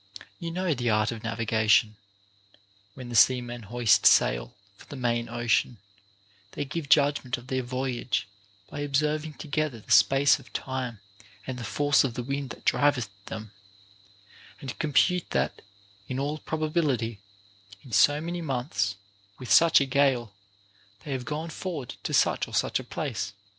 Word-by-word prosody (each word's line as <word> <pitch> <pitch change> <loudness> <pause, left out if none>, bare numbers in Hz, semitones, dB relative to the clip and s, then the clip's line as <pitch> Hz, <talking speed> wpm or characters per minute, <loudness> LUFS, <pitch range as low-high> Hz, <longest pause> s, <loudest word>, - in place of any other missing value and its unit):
You 170 - -4
know 180 0 -1
the 120 -3 -1
art 105 0 +2
of 115 -1 -7
navigation; 110 -1 +2 1.0
when 125 -2 -9
the 120 - -5
seamen 120 0 +3
hoist 120 -2 +4
sail - - +3 0.2
for - - -17
the - - -9
main 120 -2 -1
ocean, 120 0 0 0.8
they 145 - -3
give 145 +1 -5
judgment 140 -4 +3
of 120 - -12
their 130 0 -1
voyage 125 -4 -2 0.4
by 145 - -8
observing 150 +2 -1
together 155 -5 -3
the - - -12
space 140 +2 +5
of 130 - -17
time 125 -5 -4 0.4
and 130 -1 -5
the - - -6
force 145 +3 +2
of 125 -4 -2
the 125 - -3
wind 140 +1 -3
that - - -11
driveth 130 -7 +2 0.2
them, 110 -1 -7 1.1
and 135 -2 -7
compute 165 +4 +2
that, 65 +3 -1 0.5
in 130 - -4
all 145 +3 -2
probability, 150 - -1 0.6
in 130 - -14
so 145 +7 +4
many 170 +2 -4
months, 125 -9 -2 0.4
with 125 - -7
such 165 0 +7
a 140 - +1
gale, 130 -5 +1 0.7
they 145 - -5
have 130 -2 -3
gone 155 +3 -4
forward 155 -8 -5
to - - -4
such - - +2
or - - -7
such - - +1
a - - -7
place. 100 0 -4
130 Hz, 155 wpm, -27 LUFS, 120-145 Hz, 1.1 s, such